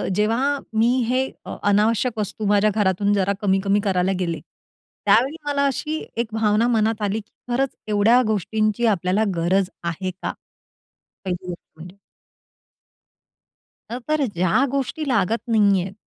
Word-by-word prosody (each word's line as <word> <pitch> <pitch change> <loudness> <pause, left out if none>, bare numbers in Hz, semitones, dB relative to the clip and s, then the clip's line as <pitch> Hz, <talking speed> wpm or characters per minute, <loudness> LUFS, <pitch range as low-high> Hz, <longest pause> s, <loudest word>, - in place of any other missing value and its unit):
जेव्हा 240 +8 +1 0.2
मी 230 - +4 0.2
हे 255 +2 +1 0.3
अ - - -6
अनावश्यक 220 +4 +2
वस्तू 210 +1 -3
माझ्या 205 +1 +4
घरातून 200 -1 +2
जरा 200 0 +1
कमी-कमी 195 0 +2
करायला 190 -2 +1
गेले. 170 -3 -2 0.7
त्यावेळी 270 +6 +4
मला 285 -1 +1
अशी 305 +3 -2 0.2
एक 235 - 0
भावना 220 +1 +2
मनात 225 -2 +1
आली, 205 +1 0
की 215 +2 -15 0.2
खरंच 270 +2 0
एवढ्या 215 +4 +4
गोष्टींची 215 +2 0
आपल्याला 195 +1 +1
गरज 180 +3 +1
आहे 180 +2 -3
का? 180 - -5 0.9
पहिली 180 0 -4
गोष्ट 175 -1 -8
म्हणजे. 175 +3 -11 1.9
अ, 235 - -4
बरं 305 -2 +1
ज्या 185 +10 +2
गोष्टी 275 +3 -2
लागत 230 -3 +1
नाहीयेत, 200 -4 +2
210 Hz, 135 wpm, -22 LUFS, 190-235 Hz, 1.9 s, मी